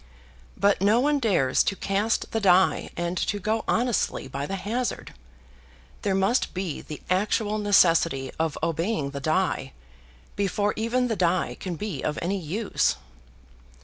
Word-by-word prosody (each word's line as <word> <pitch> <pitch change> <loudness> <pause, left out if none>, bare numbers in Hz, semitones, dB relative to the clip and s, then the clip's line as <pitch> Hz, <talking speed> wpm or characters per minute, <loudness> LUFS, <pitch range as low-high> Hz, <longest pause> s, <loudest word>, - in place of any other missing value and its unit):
But 200 -1 +2
no 210 +4 +4
one 290 +2 +2
dares 175 - +2
to 195 - -1
cast 200 +4 -1
the 225 - 0
die, 190 -2 +3
and 175 +1 -2
to 205 - -1
go 215 +3 -1
honestly 240 - 0
by 140 +2 -4
the 195 - -3
hazard. 230 +6 -3 0.9
There 195 -2 0
must 195 +5 +1
be 180 -5 -3
the 150 - -9
actual 210 +3 0
necessity 165 -9 +3
of 160 -2 -1
obeying 165 -2 -1
the 140 - -5
die, 155 -3 0 0.6
before 205 +1 0
even 240 +3 0
the 225 - -1
die 180 -1 +1
can 180 -2 -4
be 190 -6 -4
of 150 - -1
any 190 +3 -1
use. 190 +6 0
195 Hz, 145 wpm, -25 LUFS, 165-215 Hz, 0.9 s, no